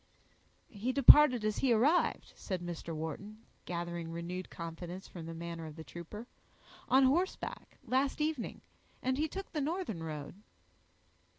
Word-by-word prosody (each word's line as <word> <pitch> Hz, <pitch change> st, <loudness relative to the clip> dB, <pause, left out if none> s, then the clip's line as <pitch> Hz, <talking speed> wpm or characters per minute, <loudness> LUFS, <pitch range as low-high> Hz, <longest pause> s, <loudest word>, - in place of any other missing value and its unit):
"He 225 Hz, +4 st, -2 dB
departed 265 Hz, -3 st, +8 dB
as 215 Hz, -1 st, 0 dB
he 265 Hz, -, +2 dB
arrived," 275 Hz, +10 st, +2 dB
said 185 Hz, -3 st, -4 dB
Mr. 170 Hz, -1 st, -5 dB
Wharton, 200 Hz, +8 st, -6 dB, 0.2 s
gathering 170 Hz, -1 st, -4 dB
renewed 175 Hz, +2 st, -5 dB
confidence 175 Hz, +2 st, -7 dB
from 165 Hz, -3 st, -8 dB
the 165 Hz, -, -5 dB
manner 165 Hz, -1 st, -6 dB
of 155 Hz, -, -9 dB
the 160 Hz, -, -8 dB
trooper; 170 Hz, -, -8 dB, 0.6 s
"on 265 Hz, +1 st, +6 dB
horseback, 335 Hz, +9 st, 0 dB
last 270 Hz, +3 st, +1 dB
evening, 300 Hz, -5 st, -2 dB, 0.4 s
and 260 Hz, +2 st, 0 dB
he 310 Hz, -, +2 dB
took 390 Hz, +5 st, -7 dB
the 305 Hz, -, -2 dB
northern 305 Hz, -, -2 dB
road." 150 Hz, -3 st, -5 dB
200 Hz, 140 wpm, -33 LUFS, 170-270 Hz, 0.6 s, departed